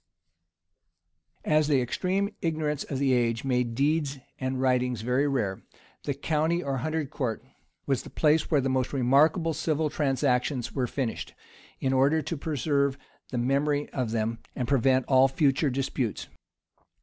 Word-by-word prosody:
] 85 Hz, 0 st, -38 dB
As 155 Hz, -, +1 dB
the 145 Hz, -3 st, +3 dB
extreme 185 Hz, +11 st, 0 dB
ignorance 155 Hz, -3 st, -1 dB
of 135 Hz, -, -4 dB
the 135 Hz, -1 st, +2 dB
age 115 Hz, -2 st, +1 dB
made 125 Hz, -3 st, 0 dB
deeds 145 Hz, +1 st, +1 dB, 0.2 s
and 130 Hz, 0 st, -2 dB
writings 125 Hz, -3 st, +1 dB
very 125 Hz, +5 st, +1 dB
rare, 105 Hz, -9 st, -1 dB, 0.4 s
the 140 Hz, -, -1 dB
county 160 Hz, +4 st, 0 dB
or 135 Hz, -1 st, -2 dB
hundred 155 Hz, +2 st, -2 dB
court 125 Hz, -7 st, -3 dB, 0.4 s
was 135 Hz, -3 st, 0 dB
the -, -, -11 dB
place 155 Hz, 0 st, +2 dB
where 150 Hz, -4 st, +3 dB
the 135 Hz, -, -1 dB
most 130 Hz, 0 st, 0 dB
remarkable 150 Hz, +6 st, +3 dB
civil 155 Hz, 0 st, -1 dB
transactions 135 Hz, -3 st, 0 dB
were 130 Hz, -3 st, 0 dB
finished, 125 Hz, -2 st, -4 dB, 0.4 s
in 135 Hz, 0 st, 0 dB
order 140 Hz, +4 st, +3 dB
to 165 Hz, -, -3 dB
preserve 140 Hz, -2 st, 0 dB, 0.3 s
the 125 Hz, -, -4 dB
memory 140 Hz, +4 st, +1 dB
of 125 Hz, -4 st, -2 dB
them, 115 Hz, +1 st, -1 dB, 0.2 s
and 125 Hz, -, -2 dB
prevent 130 Hz, 0 st, +3 dB
all 130 Hz, 0 st, +5 dB
future 140 Hz, +1 st, +2 dB
disputes. 130 Hz, -3 st, -2 dB
135 Hz, 150 wpm, -27 LUFS, 125-150 Hz, 0.4 s, all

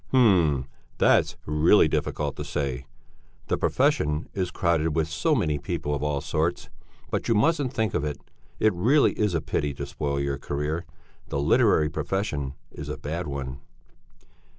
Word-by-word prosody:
"H'm! 90 Hz, -, +4 dB, 0.3 s
That's -, -, +3 dB
really 75 Hz, +2 st, +5 dB
difficult 75 Hz, -3 st, -2 dB
to 75 Hz, -, -3 dB
say. 70 Hz, -3 st, -3 dB, 0.6 s
The -, -, +1 dB
profession 75 Hz, +2 st, +1 dB
is 95 Hz, -2 st, -1 dB
crowded 80 Hz, -4 st, 0 dB
with 80 Hz, -1 st, +1 dB
so 85 Hz, -, +1 dB
many 75 Hz, -, 0 dB
people 75 Hz, +1 st, -3 dB
of 70 Hz, -, -2 dB
all 75 Hz, -1 st, -1 dB
sorts. 80 Hz, +3 st, -1 dB, 0.4 s
But -, -, -1 dB
you 115 Hz, -, +3 dB
mustn't 140 Hz, +3 st, +2 dB
think 110 Hz, -6 st, -1 dB
of -, -, 0 dB
it. 75 Hz, -2 st, -2 dB, 0.4 s
It 110 Hz, -, +3 dB
really 125 Hz, +12 st, +4 dB
is 105 Hz, -5 st, 0 dB
a 80 Hz, -, +1 dB
pity 75 Hz, -2 st, -2 dB
to -, -, -4 dB
spoil 70 Hz, -1 st, -2 dB
your 70 Hz, 0 st, -2 dB
career; 75 Hz, +5 st, -3 dB, 0.4 s
the 70 Hz, -, -2 dB
literary 75 Hz, +2 st, +3 dB
profession 75 Hz, -7 st, -2 dB, 0.2 s
is -, -, -8 dB
a -, -, -4 dB
bad 85 Hz, +3 st, -4 dB
one." 70 Hz, -2 st, -5 dB
75 Hz, 160 wpm, -26 LUFS, 70-90 Hz, 0.6 s, really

